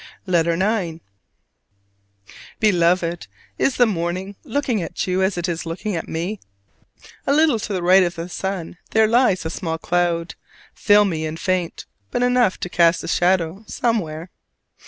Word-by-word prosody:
LETTER 170 -3 +2
IX. 185 -3 -1 1.6
Beloved: 175 - +2 0.3
Is 270 - +2
the 245 - +5
morning 185 0 -3
looking 255 -5 -1
at - - -3
you 185 0 0
as 190 -1 +1
it 175 +1 -1
is 170 -2 -3
looking 190 +4 -3
at 165 - -4
me? 180 +6 -3 0.9
A - - +3
little 305 -7 +3
to 210 - -5
the 185 -3 -2
right 185 +2 +6
of 175 -1 0
the 165 +1 -5
sun 180 -2 -5
there 220 0 +4
lies 225 -6 +2
a 160 - -2
small 165 -1 -3
cloud, 170 0 0 0.4
filmy 200 -7 +3
and 160 +1 -6
faint, 185 -3 -2 0.2
but 245 - -1
enough 245 -5 +2
to - - -2
cast 170 -1 +3
a - - -6
shadow 180 +2 +1
somewhere. 180 -10 -2
180 Hz, 155 wpm, -21 LUFS, 170-210 Hz, 1.6 s, right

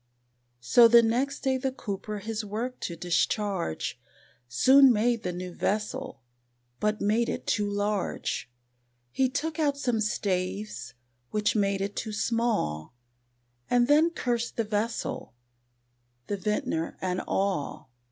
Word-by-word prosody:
So 230 - +7
the 235 0 +7
next 260 +5 0
day 265 -1 +1
the 265 +1 -1
Cooper 210 -4 -5
his 220 +2 -4
work 225 +5 -4
to 170 - -4
discharge, 180 - -1 0.5
Soon 265 - +6
made 230 +1 +2
the 180 - -2
new 180 0 -6
vessel, 235 - -2 0.6
but 210 0 0
made 220 +3 +2
it - - -4
too 205 -1 0
large; 205 -8 -2 0.6
He 260 - +2
took 310 +4 -3
out 285 -2 +1
some 245 -5 0
staves, 195 - -2 0.3
which 210 +1 0
made 200 -2 +1
it 200 +1 -3
too 220 -2 -4
small, 220 - -1 0.7
And 245 -1 +3
then 305 +4 +5
cursed 240 -7 -2
the 230 - +2
vessel, 215 - -3 0.9
the 205 - -2
Vintner 190 -5 -2
and 185 0 -1
all. 175 -7 -2
215 Hz, 130 wpm, -28 LUFS, 195-245 Hz, 0.9 s, So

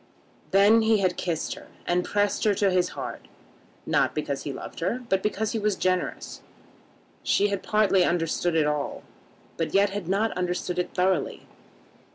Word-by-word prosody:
Then 205 +4 +5
he 220 0 +4
had 185 -3 +1
kissed 170 -3 -2
her, - - -12 0.2
and 175 +1 +1
pressed 205 +1 0
her 210 -2 +3
to 200 -1 +2
his 180 -1 +2
heart, - - -6 0.6
not - - +1
because - - -2
he - - -2
loved - - -8
her, 250 +1 -2
but 190 0 +2
because 210 +1 -1
he 225 - -1
was 210 -1 +1
generous. 185 -1 -2 0.8
She 205 +1 +2
had 200 -1 -2
partly 210 -3 +3
understood 170 0 0
it 155 -2 +3
all, 150 -1 -2 0.5
but 165 +2 -2
yet 200 0 +4
had 200 -4 -5
not 205 +4 +1
understood 180 0 -2
it 180 - -3
thoroughly. 185 +1 0
190 Hz, 170 wpm, -26 LUFS, 180-205 Hz, 0.8 s, Then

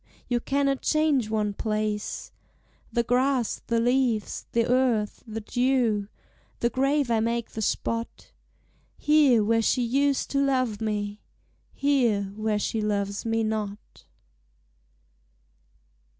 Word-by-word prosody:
You 245 -1 +1
cannot 275 +1 0
change 300 -7 +2
one 210 -2 0
place, 215 0 -3 0.6
The 235 - +1
grass, 250 0 +1
the 230 0 +1
leaves, 240 -2 0
the 230 0 +2
earth, 245 -4 +1
the 225 0 -5
dew, 245 -3 +1 0.5
The 235 - +1
grave 275 0 +1
I 225 - +3
make 230 +1 -1
the 220 - -5
spot, 230 +2 -3 0.7
Here, 290 -7 +4
where 225 +2 +2
she 245 +3 +2
used 275 +3 +1
to 280 0 +2
love 255 -6 0
me, 210 -1 -3 0.5
Here, 255 -8 +2
where 215 0 0
she 220 +1 -1
loves 200 -1 -2
me 225 0 +1
not. 215 -2 -5
230 Hz, 120 wpm, -26 LUFS, 215-260 Hz, 0.7 s, Here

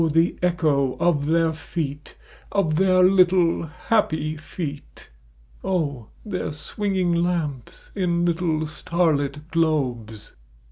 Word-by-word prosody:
the 165 +2 +3
echo 155 -7 +1
of 150 -5 +2
their 165 0 +2
feet 150 -2 -5 0.2
— - - -25
of 170 -6 +1
their 185 0 +4
little 180 -3 +4
happy 155 -3 0
feet:! 150 - -8 1.1
their 195 -6 -3
swinging 185 +3 -1
lamps 170 -7 -2
in 175 -3 0
little 165 -2 0
starlit 150 -2 -1
globes. 125 -10 -1
165 Hz, 100 wpm, -23 LUFS, 150-180 Hz, 1.1 s, their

